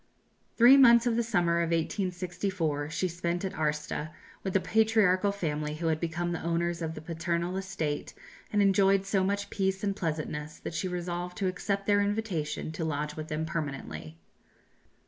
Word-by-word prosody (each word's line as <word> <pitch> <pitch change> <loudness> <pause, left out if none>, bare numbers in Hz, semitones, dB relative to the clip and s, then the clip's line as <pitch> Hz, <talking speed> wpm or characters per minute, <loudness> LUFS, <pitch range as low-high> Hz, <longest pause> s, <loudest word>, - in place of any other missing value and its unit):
Three 245 +4 +8
months 235 -3 +7
of 240 -2 +2
the 235 - +2
summer 175 -7 +1
of 170 -1 0
1864 175 -3 -1
she 165 +4 -1
spent 175 +1 -2
at 190 - -3
Arsta 150 0 -2 0.3
with 190 - -3
the 195 - +4
patriarchal 210 -2 +3
family 150 -6 -2
who 165 +2 -5
had 155 -1 0
become 175 +1 -2
the 170 - -3
owners 170 +1 -1
of 160 0 -3
the 155 - -7
paternal 170 +2 -2
estate, 190 -6 -3 0.4
and 205 -1 +3
enjoyed 195 0 +4
so 195 -1 +1
much 200 +1 -1
peace 190 -1 -1
and 200 -1 0
pleasantness 155 -4 -3
that - - -6
she 170 +4 -1
resolved 180 0 -4
to 195 -3 0
accept 195 +2 -2
their 205 0 +4
invitation 200 -8 -2
to 160 +1 -4
lodge 150 -1 -2
with 155 0 -6
them 155 0 -2
permanently. 135 - -5
175 Hz, 170 wpm, -29 LUFS, 160-195 Hz, 0.4 s, Three